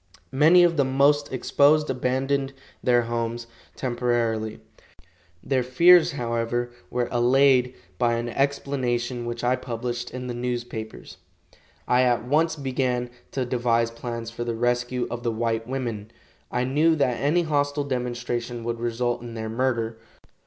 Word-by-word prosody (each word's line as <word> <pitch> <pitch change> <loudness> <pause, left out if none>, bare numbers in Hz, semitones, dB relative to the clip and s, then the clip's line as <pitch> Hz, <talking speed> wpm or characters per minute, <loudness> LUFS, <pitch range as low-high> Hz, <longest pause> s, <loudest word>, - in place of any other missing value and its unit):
Many 160 +6 +6
of 170 -2 +3
the 140 - +4
most 140 +2 +2
exposed 145 +3 +3
abandoned 135 +2 -1 0.3
their 120 -1 +3
homes 115 0 -3 0.3
temporarily. 120 -3 -1 0.8
Their 130 -2 +1
fears, 170 +8 +5
however, 120 -1 -2 0.2
were 125 0 -1
allayed 125 +1 +3 0.2
by 120 -1 +2
an 120 +1 -2
explanation 125 -3 -1
which 120 0 -5
I 125 +1 +3
published 120 -1 -4
in 125 0 -6
the 125 - -4
newspapers. 120 -2 -5 0.7
I 125 +1 +4
at 120 -3 +2
once 155 +5 +2
began 130 -3 -2 0.2
to 130 -2 -1
devise 120 -2 +1
plans 115 -1 -6
for 120 +1 -5
the 120 -1 -3
rescue 120 +1 0
of 120 - -4
the 120 - -1
white 115 0 -2
women. 120 -5 -4 0.4
I 125 +1 -1
knew 150 +6 +3
that 125 -6 0
any 155 +5 +2
hostile 145 -2 0
demonstration 120 -2 -3
would 115 0 -3
result 120 +1 -1
in 120 -1 -8
their 110 -1 -4
murder. 115 -2 -1
125 Hz, 140 wpm, -25 LUFS, 120-135 Hz, 0.8 s, Many